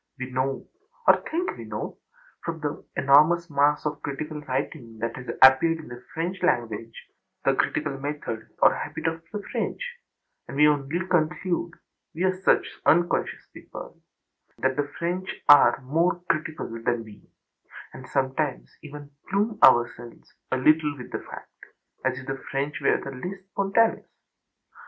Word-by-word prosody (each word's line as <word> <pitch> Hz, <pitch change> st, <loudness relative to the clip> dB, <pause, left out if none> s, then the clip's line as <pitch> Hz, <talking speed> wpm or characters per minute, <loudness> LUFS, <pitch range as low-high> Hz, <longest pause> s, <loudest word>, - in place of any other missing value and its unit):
We 130 Hz, 0 st, -6 dB
know, 130 Hz, +1 st, -1 dB, 0.4 s
or -, -, +6 dB
think 350 Hz, +3 st, -1 dB
we -, -, -8 dB
know, -, -, -6 dB, 0.4 s
from 165 Hz, -1 st, -4 dB
the 145 Hz, -1 st, -4 dB
enormous 155 Hz, +5 st, +5 dB
mass 145 Hz, +1 st, +2 dB
of 150 Hz, -1 st, -3 dB
critical 150 Hz, +2 st, -5 dB
writing 125 Hz, -4 st, -4 dB
that 115 Hz, +1 st, -2 dB
has 125 Hz, -, -9 dB, 0.2 s
appeared 135 Hz, +5 st, +7 dB
in 160 Hz, -, -11 dB
the 120 Hz, 0 st, -10 dB
French 175 Hz, +4 st, -3 dB
language 115 Hz, -8 st, -1 dB, 0.4 s
the -, -, +4 dB
critical 150 Hz, -3 st, -1 dB
method 140 Hz, -6 st, -5 dB
or -, -, +7 dB
habit -, -, -6 dB
of 165 Hz, 0 st, -1 dB
the 210 Hz, -1 st, -5 dB
French; -, -, -2 dB, 0.7 s
we 150 Hz, +2 st, +4 dB
only 150 Hz, +5 st, 0 dB
conclude 175 Hz, 0 st, 0 dB, 0.4 s
(we 170 Hz, -, -2 dB
are 185 Hz, 0 st, +3 dB
such -, -, +1 dB
unconscious 175 Hz, +3 st, +2 dB
people) -, -, -11 dB, 0.6 s
that 130 Hz, 0 st, +1 dB
the 145 Hz, +1 st, -1 dB
French 180 Hz, +2 st, -2 dB, 0.2 s
are 145 Hz, -2 st, +7 dB
âmore 165 Hz, +6 st, 0 dB
criticalâ 155 Hz, -8 st, -3 dB
than 120 Hz, -1 st, 0 dB
we, 110 Hz, -2 st, -15 dB, 0.6 s
and 130 Hz, -, -10 dB
sometimes 135 Hz, +2 st, -1 dB
even 145 Hz, -1 st, -10 dB, 0.2 s
plume 205 Hz, +2 st, 0 dB
ourselves 120 Hz, 0 st, +3 dB, 0.2 s
a 130 Hz, -, +2 dB
little 150 Hz, +2 st, +3 dB
with 125 Hz, -, -10 dB
the -, -, -3 dB
fact, -, -, -12 dB, 0.4 s
as 130 Hz, 0 st, 0 dB
if 130 Hz, -, -8 dB
the 135 Hz, 0 st, -4 dB
French 140 Hz, +1 st, -2 dB
were -, -, +3 dB
the 135 Hz, -, -7 dB
less 180 Hz, +9 st, -6 dB
spontaneous. 200 Hz, +4 st, +1 dB
145 Hz, 150 wpm, -26 LUFS, 130-170 Hz, 0.7 s, appeared